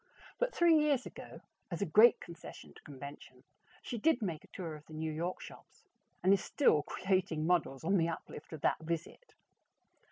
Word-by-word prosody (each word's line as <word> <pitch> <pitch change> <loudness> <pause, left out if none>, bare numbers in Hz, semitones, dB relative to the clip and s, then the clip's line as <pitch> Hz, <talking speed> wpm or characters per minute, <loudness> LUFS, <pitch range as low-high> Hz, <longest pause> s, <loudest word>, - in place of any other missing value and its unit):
But - - +1
three 335 -6 +5
years 290 -4 +2
ago, - - -10 0.3
as 175 +1 -2
a - - 0
great 215 +7 +6
concession 170 -1 -11
to - - -16
convention, 140 0 -11 0.4
she 240 - -4
did 320 +2 +3
make 170 -6 -3
a - - -17
tour 170 -5 -6
of 150 0 -14
the 155 - -10
New 160 0 -2
York 170 +4 -3
shops, - - -13 0.4
and 190 +2 +6
is 200 - +1
still 210 - +3
creating 185 -3 -1
models 160 -6 +1
on 195 +4 +3
the 165 -1 +2
uplift 165 -2 -8
of 160 -3 -7
that - - +2
visit. 170 - -5
170 Hz, 185 wpm, -33 LUFS, 155-210 Hz, 0.4 s, great